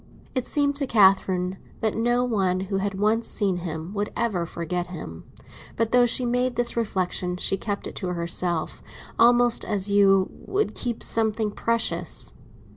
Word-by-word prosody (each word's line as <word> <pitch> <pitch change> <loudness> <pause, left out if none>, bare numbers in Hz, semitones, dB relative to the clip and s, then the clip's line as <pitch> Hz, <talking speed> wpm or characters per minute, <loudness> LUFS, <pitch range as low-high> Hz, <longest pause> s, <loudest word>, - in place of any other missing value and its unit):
It 255 -3 -2
seemed 285 -1 +2
to 280 -2 -1
Catherine 190 -4 +3 0.2
that 220 -1 0
no 240 +2 +1
one 195 -7 0
who 195 +1 -2
had 200 0 -2
once 220 +2 +1
seen 195 -4 -1
him 165 +1 -5
would 205 0 -2
ever 195 -8 -1
forget 175 +2 -3
him; 155 - -8 0.5
but 230 0 0
though 245 0 +5
she 250 +1 +2
made 245 +1 0
this 240 0 0
reflexion 185 -5 -1
she 195 - +1
kept 200 +1 -4
it - - -6
to 185 - -3
herself, 170 -1 -1 0.4
almost 240 0 +5
as 200 -1 -1
you 195 -2 +4
would 410 +2 -2
keep 235 -2 -3
something 220 -1 +1
precious. 200 -7 -1
205 Hz, 160 wpm, -24 LUFS, 180-235 Hz, 0.5 s, though